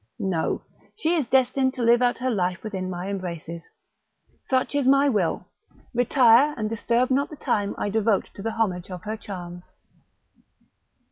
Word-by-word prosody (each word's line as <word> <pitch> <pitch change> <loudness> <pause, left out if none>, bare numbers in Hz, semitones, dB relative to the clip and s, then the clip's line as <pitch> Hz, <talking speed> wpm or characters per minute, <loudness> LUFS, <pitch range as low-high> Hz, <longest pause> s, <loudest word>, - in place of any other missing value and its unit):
No! 180 -4 -1 0.3
she 345 -6 0
is 310 -8 0
destined 260 +1 +2
to 245 - -2
live 235 +1 +5
out 245 -1 +2
her 255 0 -1
life 185 -4 -1
within 190 -4 -4
my 180 +1 -5
embraces: 170 -4 -5 0.8
such 260 +1 0
is 285 -3 +1
my 275 +1 +5
will; 205 -10 0 0.5
retire, 245 +3 +4
and 215 -2 -1
disturb 235 +3 0
not 275 +2 +1
the 305 - -9
time 205 -7 -1
I 205 - -2
devote 220 -1 +1
to - - -9
the 225 +2 -3
homage 185 -6 -1
of 180 -2 -7
her 215 +1 -3
charms." 175 -4 -8
225 Hz, 160 wpm, -24 LUFS, 185-255 Hz, 0.8 s, live